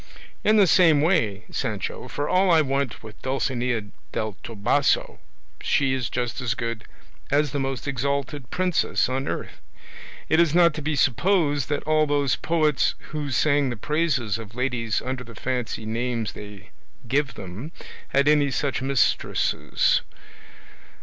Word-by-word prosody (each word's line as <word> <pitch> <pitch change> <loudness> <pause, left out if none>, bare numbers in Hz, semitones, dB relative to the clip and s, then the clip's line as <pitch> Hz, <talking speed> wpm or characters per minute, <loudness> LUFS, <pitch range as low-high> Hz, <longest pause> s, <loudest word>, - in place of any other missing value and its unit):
In 215 +1 +4
the 205 - +7
same 165 -4 +5
way, 110 - +1
Sancho, - - -3
for 145 +1 -3
all 185 +1 +3
I 165 -2 +6
want 135 -5 -2
with 110 -2 -12
Dulcinea 125 -3 -1 0.3
del 110 -2 -3
Toboso 120 +6 +1 0.4
she 135 -2 +2
is 130 -3 -2
just 125 +1 -3
as 120 -3 -1
good 115 -2 -4 0.4
as 145 0 +2
the 145 - -2
most 135 0 -3
exalted 140 0 -2
princess 180 -4 +1
on 130 +2 -2
earth. - - -5 0.7
It 160 - +3
is 170 -2 +3
not 170 -2 +6
to 155 - -5
be 150 +1 -1
supposed 145 - +2
that 145 - -1
all 155 0 +2
those 145 -2 +1
poets 155 -5 +1 0.2
who 150 -2 -3
sang 140 +1 +2
the 120 - -4
praises 140 -5 0
of 110 0 -10
ladies 125 -3 -1
under 130 0 -3
the 115 -2 -12
fancy 125 -2 -3
names 115 0 -2
they 105 -2 -11 0.4
give 140 +1 0
them, 100 - -8 0.4
had 140 +1 +2
any 150 -1 +4
such 135 0 -1
mistresses. 135 0 +1
135 Hz, 150 wpm, -24 LUFS, 120-150 Hz, 0.7 s, the